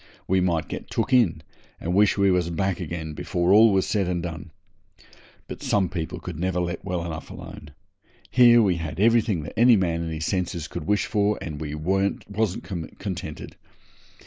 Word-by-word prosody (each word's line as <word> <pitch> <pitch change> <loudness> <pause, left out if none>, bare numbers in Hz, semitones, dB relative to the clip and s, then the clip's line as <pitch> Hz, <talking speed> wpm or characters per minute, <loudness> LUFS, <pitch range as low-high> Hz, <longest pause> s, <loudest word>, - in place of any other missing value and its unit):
We 95 0 +2
might 85 -3 0
get - - -7
took 135 - -1
in, 90 -11 +3 0.4
and 85 - -3
wish 105 +2 +4
we 100 -1 +4
was 90 -2 +1
back 95 +2 -1
again 80 -2 -5
before 90 +4 0
all 110 +1 +7
was 95 -1 +2
said 100 -4 0
and 90 -2 -2
done. 85 0 -6 1.0
But - - -8
some 95 -4 +1
people 80 -4 -4
could 85 -3 -7
never 90 0 -1
let 85 -1 -3
well 90 -3 -3
alone. 80 -2 -8 0.6
Here 120 -2 +7
we 95 -4 +2
had 80 0 -5
everything 110 -5 +3
that 75 - -8
any 120 +1 +6
man 85 -4 0
in 85 - -3
his 80 0 -4
senses 90 -4 -2
could 85 -1 -6
wish 105 0 +2
for, 105 -1 +1
and 75 -3 -6
we 75 -1 -4
wasn't 95 +4 -1 0.3
contented. 85 -6 -6
90 Hz, 175 wpm, -24 LUFS, 85-100 Hz, 1.0 s, all